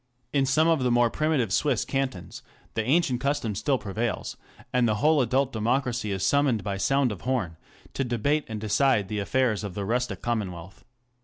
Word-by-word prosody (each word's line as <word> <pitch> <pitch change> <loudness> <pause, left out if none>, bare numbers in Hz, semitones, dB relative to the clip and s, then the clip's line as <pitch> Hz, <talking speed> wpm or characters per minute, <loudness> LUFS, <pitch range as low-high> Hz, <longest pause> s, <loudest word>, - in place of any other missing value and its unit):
In 140 -2 +3
some^of 155 +4 +3
the 125 - +1
more 120 -1 +3
primitive 150 - 0
Swiss 150 - +1
cantons 135 -9 -3 0.3
the 110 - -1
ancient 130 -1 +1
custom 140 -6 -1
still 135 +7 0
prevails, 110 +2 -3 0.4
and 125 -1 +3
the 110 - +1
whole 150 +6 +3
adult 130 +2 +1
democracy 120 0 -1
is 95 -1 -1
summoned 135 -3 +2
by 100 -2 -3
sound 135 +5 +2
of 100 - -7
horn 120 -10 -1 0.4
to 135 - -1
debate 135 +5 0
and 110 -1 -5
decide 110 -1 +2
the 105 -1 -2
affairs 110 0 0
of 100 -4 -6
the 100 - -3
rustic 125 +4 -2
commonwealth. 95 -6 -4
120 Hz, 175 wpm, -26 LUFS, 105-135 Hz, 0.4 s, In